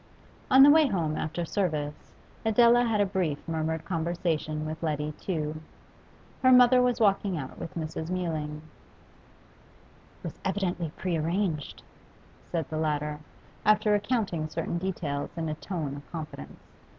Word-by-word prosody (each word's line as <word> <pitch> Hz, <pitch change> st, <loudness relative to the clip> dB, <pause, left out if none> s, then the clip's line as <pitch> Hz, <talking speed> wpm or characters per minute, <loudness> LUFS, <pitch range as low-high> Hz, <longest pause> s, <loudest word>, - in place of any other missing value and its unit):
On 265 Hz, +1 st, +8 dB
the 290 Hz, -, +9 dB
way 310 Hz, -1 st, +6 dB
home 165 Hz, -, -1 dB
after 160 Hz, +3 st, -3 dB
service, 155 Hz, -6 st, -2 dB, 0.3 s
Adela 235 Hz, +2 st, +5 dB
had 225 Hz, -3 st, +1 dB
a -, -, +4 dB
brief 185 Hz, -7 st, -1 dB
murmured 160 Hz, 0 st, -2 dB
conversation 165 Hz, -3 st, -1 dB
with 155 Hz, +1 st, -5 dB
Letty 150 Hz, -2 st, -1 dB
Tew. 155 Hz, -4 st, -3 dB, 0.8 s
Her 255 Hz, -, +6 dB
mother 250 Hz, 0 st, +7 dB
was 250 Hz, -1 st, +2 dB
walking 200 Hz, -3 st, +2 dB
out 135 Hz, -3 st, -7 dB
with -, -, -7 dB
Mrs. 160 Hz, 0 st, -4 dB
Mewling. 155 Hz, -4 st, -3 dB
'It 155 Hz, -, -27 dB
was -, -, -7 dB
evidently 180 Hz, -4 st, -1 dB
pre 180 Hz, -3 st, -1 dB
arranged,' 165 Hz, -1 st, -2 dB, 0.7 s
said 165 Hz, -4 st, -1 dB
the 155 Hz, -, -2 dB
latter, 150 Hz, -1 st, -1 dB, 0.4 s
after 215 Hz, 0 st, +4 dB
recounting 205 Hz, -7 st, 0 dB
certain 165 Hz, +2 st, -2 dB
details 165 Hz, -6 st, -3 dB
in 165 Hz, -1 st, -2 dB
a -, -, -1 dB
tone 155 Hz, -4 st, -4 dB
of 145 Hz, -, -13 dB
confidence. 150 Hz, -, -7 dB
165 Hz, 140 wpm, -28 LUFS, 155-200 Hz, 0.8 s, the